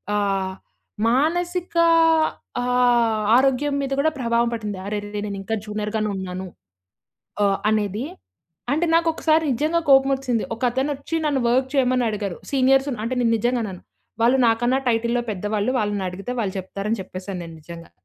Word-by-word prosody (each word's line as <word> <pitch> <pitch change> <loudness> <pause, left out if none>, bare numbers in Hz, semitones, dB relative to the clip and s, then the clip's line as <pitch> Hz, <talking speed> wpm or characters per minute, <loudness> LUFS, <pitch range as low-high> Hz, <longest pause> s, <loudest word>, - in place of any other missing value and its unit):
ఆహ్, 195 -2 0 0.5
మానసిక 345 +7 0 0.9
ఆహ్, 240 -3 +2 0.2
ఆరోగ్యం 275 +2 +2
మీద 275 -1 -3
కూడా 315 +2 +3
ప్రభావం 235 -1 +1
పడింది. 210 -3 -4
"అరెరె, 205 0 -4
నేనింకా 200 +2 -3
జూనియర్ 210 0 -4
గానే 215 -1 0
ఉన్నాను" 185 0 -5 1.0
ఆహ్, 200 -1 +2
అనేది 210 +2 -1 0.7
అంటే 315 +4 +1
నాకు 335 0 +3
ఒకసారి 315 0 +2
నిజంగా 310 +7 +1
కోపం 270 0 +6
వచ్చింది. 250 -4 -1
ఒక 230 - -18
అతనొచ్చి 280 +4 -2
నన్ను 290 -3 +1
వర్క్ 255 +2 +2
చేయమని 255 -2 +2
అడిగారు. 205 -4 -4
సీనియర్స్ 270 0 +3 0.2
అంటే 230 +3 -2
నేను 230 -1 +2
నిజంగా 240 +2 0
అనను. 190 -4 -6 0.4
వాళ్ళు 250 +3 +4
నాకన్నా 240 +3 +2
టైటిల్లో 235 +1 +1
పెద్దవాళ్ళు, 205 +3 -1
వాళ్ళనడిగితే 200 0 -3
వాళ్ళు 195 -3 -3
చెప్తారని 200 +3 -3
చెప్పేసాను 185 0 -7
నేను 165 -1 -10
నిజంగా. 170 +1 -11
235 Hz, 140 wpm, -22 LUFS, 205-265 Hz, 1.0 s, కోపం